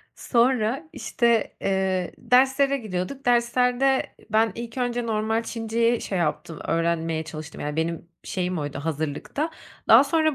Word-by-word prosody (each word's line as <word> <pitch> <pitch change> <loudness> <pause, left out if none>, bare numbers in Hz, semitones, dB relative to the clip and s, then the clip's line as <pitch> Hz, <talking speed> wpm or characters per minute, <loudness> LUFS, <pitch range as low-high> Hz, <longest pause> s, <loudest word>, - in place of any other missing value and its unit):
Sonra, 245 +4 +1
işte, 235 -6 0
eee, 190 -2 0
derslere 270 +2 +3
gidiyorduk. 215 +4 -4
Derslerde 250 +2 +2 0.2
ben 220 +1 +3
ilk 235 +1 -7
önce 245 -1 -1
normal 220 +1 0
Çinceyi 230 0 0
şey 190 - -3
yaptım, 165 0 -2
öğrenmeye 165 -1 0
çalıştım. 155 -1 -8
Yani, 150 +1 -3
benim 165 +1 -2 0.2
şeyim 180 -1 -2
oydu 145 -2 -4
hazırlıkta. 155 - -3 0.4
Daha 230 +5 +8
sonra 315 +1 +2
225 Hz, 130 wpm, -24 LUFS, 170-250 Hz, 0.4 s, Daha